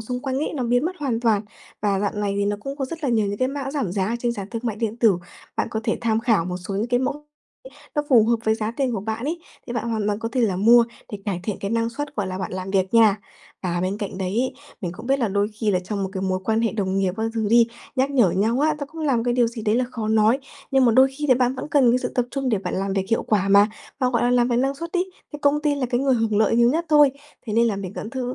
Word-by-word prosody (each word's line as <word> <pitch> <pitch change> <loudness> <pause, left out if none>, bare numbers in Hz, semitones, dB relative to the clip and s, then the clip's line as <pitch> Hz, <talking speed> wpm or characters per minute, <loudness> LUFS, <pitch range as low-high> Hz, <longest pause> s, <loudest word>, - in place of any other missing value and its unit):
xung 250 +3 -4
quanh 265 -1 -1
ấy 300 - -2
nó 260 - -2
biến 245 +4 +2
mất 365 +2 -2
hoàn 250 -6 -1
toàn. 220 -3 +2 0.4
Và 200 -2 +1
dạo 205 - 0
này 205 -1 -1
thì 200 - +1
nó 205 0 0
cũng 275 +3 -6
có 275 - -2
rất 325 +4 -7
là - - +1
nhiều 220 -3 +2
những 200 0 -3
cái 255 - +1
mã 275 -1 -4
giảm 270 - -2
giá 190 -1 0
ở 230 - -1
trên 240 0 0
sàn 200 -4 -6
thương 230 0 -4
mại 225 -3 -2
điện 225 0 -2
tử, 215 -7 +3 0.4
bạn - - 0
có 220 - -2
thể 225 - 0
tham 225 -1 +1
khảo 225 -8 +2
một 180 0 -3
số 185 +2 -6
những 210 +4 0
cái 245 0 +2
mẫu 285 +3 -3 0.7
nó 295 - +1
phù 230 -5 +6
hợp 235 0 +3
với 220 0 +3
giá 220 -1 -2
tiền 265 -3 0
của 220 - -2
bạn 220 +4 -4
ấy, 335 +3 -2 0.3
thì 240 - -5
bạn 235 0 -2
hoàn 215 -2 -1
toàn 205 0 0
có 225 - -3
thể 255 - +1
là 205 -6 +1
mua 230 +4 +6 0.3
để 205 - -4
cải 195 -4 -2
thiện 210 0 -3
cái 200 - -3
năng 230 0 +1
suất, 290 +4 -6
gọi 205 -3 -1
là, 185 0 -4
bạn 190 - -4
làm 185 +1 -4
việc 190 +2 0
nha. 220 -3 +6 0.5
Và 175 -1 -1
bên 190 +3 -2
cạnh 195 -2 -5
đấy 190 - -2
ấy, 255 +1 0 0.3
mình 175 -3 -3
cũng 240 - -10
biết 275 +1 +2
là 235 - +1
đôi 200 +1 +1
khi 215 0 -2
là 185 - +2
trong 195 +2 -4
một 190 - -2
cái 190 -1 -4
mối 185 -1 0
quan 220 0 +1
hệ 230 - 0
đồng 195 -3 -1
nghiệp 185 -2 0
các 220 - -2
thứ 220 -2 0
đi, 235 0 +6 0.3
nhắc 265 +2 +2
nhở 240 -10 +4
nhau 225 +8 +1
á, 305 0 +3
nó 285 - -4
cũng 325 +2 -10
là 285 -5 +2
cái 240 0 +1
điều 240 -2 +3
gì 230 -1 -6
đấy 215 0 +1
là 250 +1 +2
khó 220 -3 -4
nói. 220 +3 +4 0.3
Nhưng 265 -1 +4
mà 235 - +4
đôi 260 +3 +6
khi 295 - -1
là 255 - +5
bạn 250 +1 +1
vẫn 260 +3 -6
cần 270 -5 +4
cái 250 - +3
sự - - -3
tập 245 - +2
trung 270 -2 -2
để 215 -5 +1
bạn - - -4
làm 195 +1 -1
việc 195 -1 0
hiệu 225 - +2
quả 200 -2 +1
mà, 200 +2 +6 0.3
và, 255 -2 +1
gọi 235 - +1
là, 245 - +2
làm 245 0 +3
việc 240 - +1
năng 270 +2 +1
suất 335 +4 -7
ấy, 370 +1 0 0.2
thì 295 - -6
công 290 +1 +3
ty 295 -1 +2
là 265 -3 -1
cái 245 0 0
người 270 -1 +3
hưởng 225 -3 0
lợi 220 +1 +3
nhiều 235 +1 +5
nhất 330 +4 0
thôi. 295 -3 +6 0.4
Thế 215 - -3
nên 230 +2 +4
là 215 -4 0
mình 195 -1 -5
vẫn 215 - -6
thứ 255 -1 -3
230 Hz, 320 wpm, -23 LUFS, 205-260 Hz, 0.7 s, phù